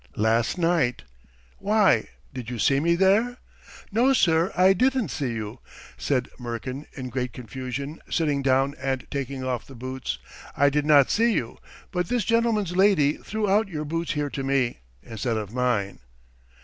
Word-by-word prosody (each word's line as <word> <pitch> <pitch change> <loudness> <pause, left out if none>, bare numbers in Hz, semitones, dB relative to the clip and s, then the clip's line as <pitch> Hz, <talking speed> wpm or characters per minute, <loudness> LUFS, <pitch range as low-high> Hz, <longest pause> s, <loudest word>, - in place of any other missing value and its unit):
"Last 115 - +1
night!" 165 -8 +1 0.6
"Why, 210 0 +3 0.3
did 125 -3 -6
you 125 - -4
see 135 +5 +3
me 170 +3 +2
there?" 205 +7 +3 0.5
"No, 245 +6 +4
sir, 170 -6 +3
I 185 +1 +6
didn't 255 - +1
see 130 -2 -2
you," 110 -2 -5 0.4
said 130 -3 -1
Murkin 125 +4 -5
in 130 -2 -6
great 125 -2 -3
confusion, 130 +4 -6
sitting 150 -4 +1
down 135 +1 +2
and 130 -1 -2
taking 135 -1 -4
off 125 -3 -3
the 135 - -12
boots. 130 +2 -4 0.4
"I 140 0 +4
did 150 +1 0
not 145 -3 +6
see 230 +1 +3
you, 115 - -3 0.3
but 180 -2 -1
this 245 -5 0
gentleman's 230 -6 +1
lady 185 -7 +4
threw 215 0 -3
out 205 +2 +3
your 155 -5 -4
boots 165 +2 -2
here 145 -2 -2
to 135 - -4
me... 135 -3 0 0.2
instead 115 +1 -3
of 105 -1 -5
mine." 120 -6 0
140 Hz, 160 wpm, -25 LUFS, 125-190 Hz, 0.6 s, I